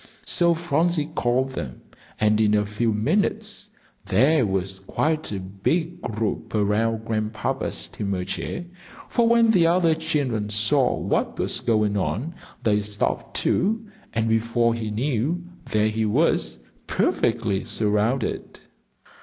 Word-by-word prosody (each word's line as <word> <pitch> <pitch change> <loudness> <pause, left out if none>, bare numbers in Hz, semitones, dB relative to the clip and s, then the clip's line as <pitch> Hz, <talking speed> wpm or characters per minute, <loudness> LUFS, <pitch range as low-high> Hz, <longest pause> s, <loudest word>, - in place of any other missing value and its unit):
So 170 -1 +3
Phronsie 165 -1 0
called 125 +2 +1
them, 65 - -6 0.4
and 105 0 +3
in 105 -1 +4
a 105 0 +2
few 110 +3 0
minutes 145 - 0 0.4
there 130 +5 +4
was 95 0 -2
quite 155 +10 -1
a 100 - -3
big 100 - -2
group 110 0 -3
around 110 +2 +1
Grandpapa's 110 -1 -2
steamer 100 -3 -2
chair; 175 - -4 0.4
for 235 -2 +2
when 230 -1 +5
the 175 -6 +4
other 170 -1 +4
children 135 -9 -1
saw 110 +6 +2
what - - -1
was - - -1
going 105 -3 +1
on, 125 - -2 0.3
they 105 -2 +3
stopped, 105 0 -2
too, 220 +4 +1 0.3
and 110 0 0
before 115 +1 +2
he 115 -2 -3
knew, 135 +9 -1 0.3
there 110 0 +2
he 110 0 -1
was 105 - +1 0.3
perfectly 95 0 +1
surrounded. 110 +4 -1
115 Hz, 130 wpm, -24 LUFS, 105-155 Hz, 0.4 s, when